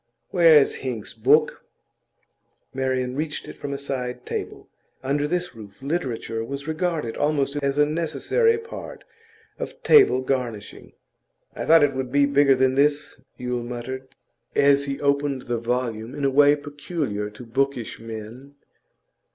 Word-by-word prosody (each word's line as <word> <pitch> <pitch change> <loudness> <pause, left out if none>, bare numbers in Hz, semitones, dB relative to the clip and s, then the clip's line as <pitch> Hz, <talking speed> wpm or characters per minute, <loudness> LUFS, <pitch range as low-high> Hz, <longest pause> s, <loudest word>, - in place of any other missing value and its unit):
'Where 170 -5 +7
is 140 - +3
Hinks's 120 -5 -5
book?' 140 +7 +2 1.1
Marian 130 -1 -1
reached 150 +1 -4
it - - -9
from 145 - -5
a 140 - -2
side 125 -3 -4
table; - - -5 0.4
under 145 +2 0
this 180 +1 -2
roof, 100 -3 -13
literature 130 -7 -3
was 140 +5 -6
regarded 160 -6 -2
almost 145 -1 0
as 140 0 -1
a 150 - +5
necessary 165 - +1
part 455 +1 -9 0.6
of - - -7
table 400 - +6
garnishing. 120 - -4 0.6
'I - - -4
thought 165 0 +6
it 145 - +2
would 130 -1 -4
be 140 +1 +4
bigger 140 -1 +4
than 130 0 +2
this,' 145 0 +1 0.2
Yule 125 -1 -3
muttered, 125 +2 -6 0.5
as 140 0 +4
he 140 -1 -4
opened 140 -2 0
the 120 -1 -2
volume 115 -1 -2
in 145 - -2
a 135 - +2
way 145 +1 +6
peculiar 145 - -4
to 105 +4 -12
bookish 125 0 -2
men. 115 +5 -9
135 Hz, 145 wpm, -24 LUFS, 125-145 Hz, 1.1 s, Where